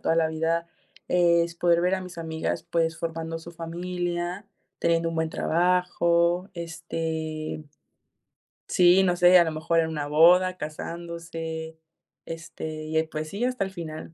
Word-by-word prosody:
toda 165 - +1
la 160 -1 +3
vida 165 +1 -1 0.4
es, 170 -1 +3
poder 170 0 +3
ver 180 +2 +2
a 190 - -3
mis 180 -2 -9
amigas, 160 0 -3
pues, 165 -2 0
formando 165 0 -4
su 170 +1 -11
familia, 175 +2 -4 0.3
teniendo 165 0 +2
un 165 - -4
buen 160 0 0
trabajo, 175 +1 +2
este, 160 -2 -4 1.0
sí, 180 +1 +5
no 180 -1 +2
sé, 180 +1 +7
a - - +6
lo 160 - -1
mejor 160 +2 0
en 160 0 0
la 145 -1 -3
boda, 180 +4 +5
casándose, 165 0 -6 0.5
este, 160 -1 -6
y 155 - -7
ya 160 0 +2
pues 155 0 -4
sí, 205 +5 -4
hasta 250 -4 0
el 190 - -5
final, 160 -3 -7
170 Hz, 155 wpm, -26 LUFS, 160-175 Hz, 1.0 s, sé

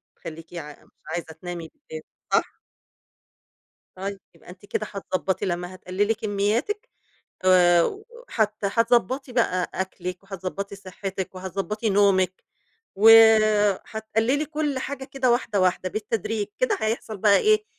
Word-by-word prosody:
بتخلّيكِ 165 +1 -10
ع 150 -4 -8
مش - - -32
عايزة 160 0 -4
تنامي 170 0 -7
بالليل 155 0 -11 0.3
صح؟ - - +1 1.4
طيب، 195 +1 -5
يبقى 165 - -16
أنتِ 195 +3 -14
كده 215 - -2
هتضبّطِي 190 -1 -2
لمّا 180 0 -3
هتقلِّلي 190 +4 -1
كمّياتِك 220 - -1 0.6
آآ 175 -2 +6
و 405 - -3 0.3
وهت 215 -2 +1
هتضبّطِي 240 +5 +1
بقى 205 -7 +1
أكلِك 185 -1 -4
وهتضبّطِي 195 +1 -6
صحّتِك 190 -1 -6
وهتضبّطِي 195 +4 -3
نومِك. 190 -2 +2 0.5
وهتقلِّلي 220 +3 +5
كل 300 -3 -2
حاجة 265 0 -5
كده 265 -2 0
واحدة، 235 -4 +1
واحدة 185 0 +1
بالتدريج. 215 +1 -2
كده 460 -5 +1
هيحصل 220 0 -2
بقى 200 +1 +5
إيه، 430 0 +3
200 Hz, 120 wpm, -24 LUFS, 185-225 Hz, 1.4 s, آآ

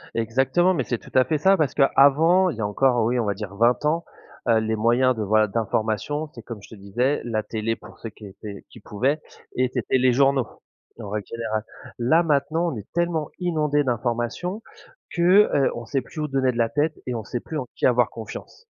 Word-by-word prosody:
Exactement, 135 +11 +2
mais - - 0
c'est 120 -4 -3
tout - - -15
à 130 - +6
fait 155 -2 0
ça 190 +5 +4
parce 150 -4 0
qu'avant, 160 +7 +4
il 125 - -8
y - - -4
a 105 - 0
encore, 120 +4 +2
heu, - - +2
oui, 125 +1 +1
on 115 - 0
va 100 - 0
dire 100 -1 -7
20 120 +6 +2
ans, 165 +3 +1 0.4
heu, 115 -1 +4
les 110 0 -1
moyens 120 +4 +3
de 110 - -3
voilà, 110 +1 +3
d'information, 110 +7 -2
c'est 115 - -10
comme 115 -4 -8
je - - -15
te - - -11
disais 120 +8 -1
la 110 -2 -1
télé 110 +1 -3
pour - - -15
ceux 115 - -7
qui 105 0 -12
étaient 100 +1 -10
qui - - -14
pouvaient 135 +9 -1 0.4
et 125 0 +1
c'était 125 +1 0
les 125 0 +3
journaux, 135 -1 +3 0.5
en 105 -3 -7
règle 105 -1 -3
générale. 110 -2 -3 0.3
Là, 145 +8 +3
maintenant 160 +2 +1
on 125 - -5
est 105 - -8
tellement 170 -3 -1
inondé 150 -5 +1
d'informations 120 - -2 0.5
que, 185 +4 +5
heu, 140 -2 +2
on 120 -1 -6
sait 135 +1 -1
plus 155 +5 -10
où 150 - -1
donner 135 -2 +1
de 120 - -7
la 115 -1 +2
tête 155 +2 0
et 125 - -2
on 110 - -4
sait 120 - -4
plus 155 +5 -6
en 130 - -3
qui - - +2
avoir 125 -2 +2
confiance. 115 - -9
125 Hz, 225 wpm, -23 LUFS, 110-150 Hz, 0.5 s, à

